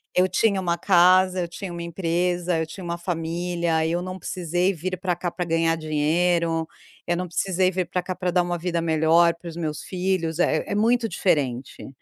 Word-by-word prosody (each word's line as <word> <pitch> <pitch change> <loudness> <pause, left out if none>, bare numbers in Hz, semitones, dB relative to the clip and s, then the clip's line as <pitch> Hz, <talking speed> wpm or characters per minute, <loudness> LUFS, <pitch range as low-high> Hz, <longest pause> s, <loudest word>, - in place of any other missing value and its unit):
Eu 180 +1 +4
tinha 195 +2 +2
uma 170 -2 -1
casa, 185 0 +4
eu 175 - -2
tinha 180 +2 -7
uma 170 0 -5
empresa, 175 0 -1
eu 160 - 0
tinha 180 +4 -9
uma 170 0 -3
família, 170 -1 -1
eu 170 +2 -1
não 185 +1 -5
precisei 180 +1 -1
vir 185 +2 -4
para 180 -1 -1
cá 175 +1 -3
para 180 +1 -4
ganhar 165 0 +1
dinheiro, 165 +2 +1 0.4
eu 175 - 0
não 180 +1 -3
precisei 185 +1 +1
vir 185 -1 -2
para 180 +2 -1
cá 185 +1 -5
para 180 0 -2
dar 180 +1 +3
uma 175 0 -2
vida 170 0 -2
melhor 165 +1 +3
para 170 +1 -12
os 160 - -9
meus 160 -3 -4
filhos, 180 -3 -2
é 155 -3 +2
é - - -3
muito 230 +2 +2
diferente. 135 - -1
175 Hz, 200 wpm, -24 LUFS, 165-185 Hz, 0.4 s, Eu